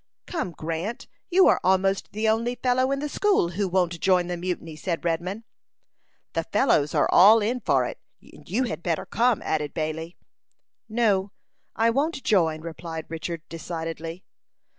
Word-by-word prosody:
"Come, 315 - -3
Grant, 165 +9 -4 0.2
you 375 +1 +5
are - - +4
almost 190 +1 +2
the 215 +1 -1
only 230 +3 +1
fellow 255 +1 +1
in 275 - +1
the 295 +2 -3
school 390 - +2
who 195 +3 -1
won't 180 -2 0
join 185 -1 +3
the 175 0 -3
mutiny," 170 -2 -4
said 170 +2 -3
Redman. 180 +6 -2 0.9
"The - - 0
fellows 150 - +2
are - - +3
all 215 +5 +8
in 230 +4 -1
for 135 - +2
it, - - -6 0.2
and - - -17
you 225 +8 +1
had 235 - -4
better 170 -2 -1
come," 240 -1 +1
added 150 -2 -2
Bailey. 160 +2 -4 0.7
"No; 210 -4 +1 0.4
I 230 +1 +3
won't 280 +3 -1
join," 160 -6 +2
replied 165 -1 -6
Richard, 165 0 -5
decidedly. 165 +1 -6
185 Hz, 160 wpm, -25 LUFS, 165-230 Hz, 0.9 s, all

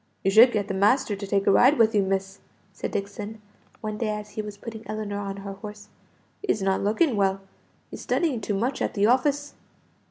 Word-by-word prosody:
"You 195 - +2
should 230 +5 +8
get 205 -3 -1
the 195 - -3
master 210 +4 +2
to 200 0 -7
take 195 0 +1
a - - +5
ride 260 +8 +5
with 225 -1 +4
you, 205 - +4
miss," 195 0 -2 0.3
said - - -4
Dixon, 205 +2 -5 0.4
one 215 -1 -4
day 225 - -1
as 210 0 -5
he 215 - -4
was 210 -1 -8
putting 225 +1 -8
Ellinor 210 -2 -4
on 195 -1 -5
her 200 - -5
horse. 210 +1 -10 0.5
"He's 220 - 0
not 190 0 +1
looking 225 - +2
well, 195 -1 +1 0.5
he's - - -8
studying 285 -10 0
too 205 - -2
much 245 +7 -1
at - - -1
the 200 0 +3
office." 285 +5 +1
210 Hz, 210 wpm, -25 LUFS, 200-230 Hz, 0.5 s, should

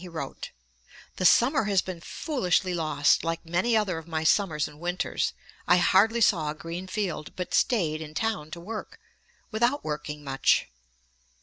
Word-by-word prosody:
17 180 -1 -9
he - - -15
wrote: 140 -3 -6 0.7
'The 185 - -1
summer 255 - +5
has 195 -3 +2
been 180 -3 -7
foolishly 185 - -1
lost, 155 -4 +2
like 165 +1 -3
many 185 +8 +1
other 190 -6 0
of 160 - -14
my 160 -1 -2
summers 160 -3 +2
and 150 0 -14
winters. 175 +2 -1 0.3
I 180 - +6
hardly 215 +6 +4
saw 165 -8 +3
a 150 - -4
green 170 +4 -6
field, 185 -6 -4
but 180 -1 -5
staid 160 -10 +1
in 155 -1 -9
town 215 -8 -2
to 170 - -7
work, 215 +5 -7 0.5
without 240 +6 +1
working 150 -1 -5
much.' 135 -1 +2
175 Hz, 170 wpm, -27 LUFS, 155-205 Hz, 0.7 s, I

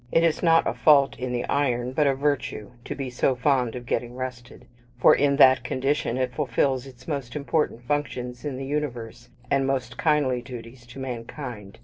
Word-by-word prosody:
It 165 - +4
is 165 -2 +2
not 165 -1 +4
a - - 0
fault 140 +2 +4
in 125 0 -3
the 120 -1 -2
iron, 125 -3 0
but 145 +2 +2
a 135 - +2
virtue, 130 -7 -2
to - - -4
be 135 -3 -5
so 125 +2 +1
fond 125 -2 +1
of 125 -1 -7
getting 120 0 -2
rusted, 125 -2 -7 0.3
for - - +7
in 140 0 +3
that 130 -2 +6
condition 135 -1 -1
it 130 -1 -1
fulfils 135 -1 0
its 125 -1 -15
most 140 -6 -4
important 145 -4 -1
functions 125 -3 -3
in 145 -4 -4
the 135 - -5
universe, 125 -5 -4 0.2
and 135 -1 +2
most 125 -3 -2
kindly 145 -6 +2
duties 120 0 -10
to 120 - -12
mankind. 120 -4 -7
130 Hz, 190 wpm, -25 LUFS, 120-140 Hz, 0.3 s, for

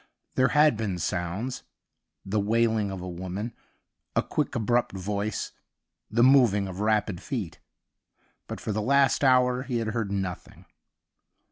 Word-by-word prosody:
There 130 - +3
had 150 -4 +4
been 105 -5 -2
sounds 90 +8 -3 0.3
— - - -54 0.3
the 100 +2 0
wailing 110 0 +1
of 95 -2 -5
a - - -5
woman, 95 +6 -5 0.6
a - - +3
quick 150 -3 -2
abrupt 120 0 +1
voice, 100 +2 -3 0.6
the 120 +3 +3
moving 120 -7 +5
of 95 0 -7
rapid 105 -3 0
feet. 110 - -5 0.9
But - - -6
for - - -4
the 110 +1 -1
last 140 +5 +3
hour 125 -1 +4
he 130 -2 -2
had 115 -1 -1
heard 110 -3 -2
nothing. 95 -3 -5
110 Hz, 145 wpm, -27 LUFS, 95-125 Hz, 0.9 s, moving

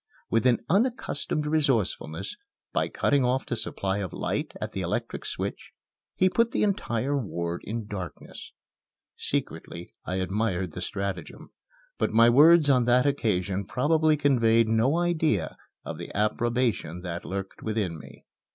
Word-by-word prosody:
With 115 +3 +3
an 120 - +2
unaccustomed 195 - 0
resourcefulness, 115 - 0 0.4
by - - +1
cutting 140 -2 +1
off 125 +2 +1
the 120 - -2
supply 100 -3 -2
of 95 -4 -4
light - - -2
at - - -4
the - - -4
electric - - -3
switch, - - -5 0.4
he 185 - +4
put 230 +5 +2
the - - +1
entire 145 - 0
ward 85 -9 -3
in 115 +1 -4
darkness. 90 -7 -8 0.6
Secretly 85 +1 -3
I 90 - -3
admired 95 -1 -1
the 90 - -7
stratagem, 95 -1 -5 0.5
but - - +2
my 115 +2 +6
words 155 +4 +7
on 130 -4 +4
that 125 +2 +4
occasion 100 -8 0
probably 155 - +2
conveyed 115 -6 +3
no 115 +8 +2
idea 160 - +1 0.3
of - - -6
the - - -6
approbation 110 -4 0
that 85 -1 -5
lurked 95 0 -5
within 105 -7 -2
me. - - -14
115 Hz, 140 wpm, -27 LUFS, 95-145 Hz, 0.6 s, words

